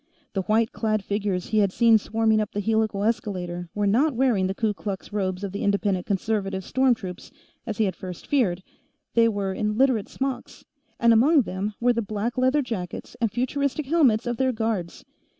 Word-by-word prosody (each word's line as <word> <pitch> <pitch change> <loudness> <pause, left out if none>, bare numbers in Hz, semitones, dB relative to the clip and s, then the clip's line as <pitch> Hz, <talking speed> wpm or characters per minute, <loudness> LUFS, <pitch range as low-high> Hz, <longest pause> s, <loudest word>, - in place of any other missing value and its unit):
The 195 - 0
white 220 +4 +1
clad 215 -2 -1
figures 200 -3 -2
he 215 - +2
had 200 -2 +3
seen 230 +1 +5
swarming 220 0 +1
up 210 - -4
the 205 - -2
helical 220 -1 0
escalator 180 -6 -2
were 205 0 0
not 255 +8 +2
wearing 230 -7 +2
the 190 - -3
Ku 220 -1 0
Klux 200 0 -6
robes 190 -2 -2
of 200 - -3
the 200 - -5
Independent 200 -2 0
Conservative 195 -1 -1
storm 260 +4 +2
troops, 185 -5 -8 0.4
as 220 - -3
he 220 - +2
had 190 -4 -1
first 180 -2 -8
feared 190 -11 +1 0.5
they 230 0 +5
were 200 -3 -2
in 210 +2 -2
Literate 255 -5 +2
smocks, 270 -1 -5 0.3
and 235 -1 +5
among 275 +6 +5
them 200 +2 -4
were 245 +1 +3
the 235 - -1
black 215 +3 -3
leather 260 +3 +2
jackets 200 -8 -6
and 225 -3 +1
futuristic 280 +4 -1
helmets 265 -7 +3
of 240 -1 -2
their 265 -1 +2
guards. 220 -7 -3
215 Hz, 190 wpm, -25 LUFS, 195-235 Hz, 0.5 s, seen